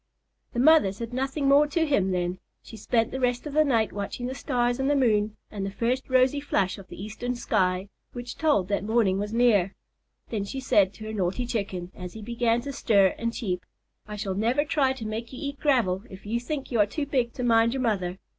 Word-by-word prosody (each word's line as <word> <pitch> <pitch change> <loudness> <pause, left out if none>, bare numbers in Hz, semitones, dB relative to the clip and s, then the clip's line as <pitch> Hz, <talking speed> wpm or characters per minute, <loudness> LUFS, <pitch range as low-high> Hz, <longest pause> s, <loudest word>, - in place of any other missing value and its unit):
The 240 - -2
mother 310 -6 +6
said 230 +4 -7
nothing 270 +2 -1
more 285 +2 +6
to 320 +3 +1
him 205 -11 +2
then. 180 0 -1 0.2
She - - -11
spent 225 +2 0
the 265 - -3
rest 245 0 0
of 295 - -5
the 310 +1 +5
night 230 -7 +1
watching 205 +4 -4
the 255 - -3
stars 245 -2 0
and 265 +1 +1
the 290 - +3
moon 215 -5 +2
and 205 -2 -4
the 195 - -2
first 240 +7 -1
rosy 255 +2 +3
flush 200 -9 0
of 190 - -12
the - - -11
eastern 220 +5 -4
sky 190 -5 0 0.2
which 245 0 -7
told 295 - +2
that 200 -1 0
morning 210 -3 +2
was 205 +1 -3
near. 220 -5 +3 0.6
Then 215 -4 -1
she 265 +7 -5
said 205 -7 +3
to 215 - -10
her 215 0 -5
naughty 195 +4 -1
Chicken, 195 -6 -3
as 180 -1 -8
he 220 - -9
began 235 +1 +1
to 280 +2 -6
stir 200 -8 +3
and 230 0 -1
cheep, 185 -7 -3 0.4
"I 210 - -6
shall 200 -2 -3
never 235 +9 +1
try 275 -4 +2
to 250 -4 -8
make 220 +2 -4
you - - -7
eat 280 -2 -5
gravel 225 -10 +2
if 190 0 -12
you 230 +3 -1
think 275 +3 -5
you 235 - +1
are 205 - +5
too 290 +7 -3
big 255 -4 0
to 255 - -4
mind 230 0 +3
your 265 - -1
mother. 190 -6 -1
230 Hz, 230 wpm, -26 LUFS, 200-260 Hz, 0.6 s, mother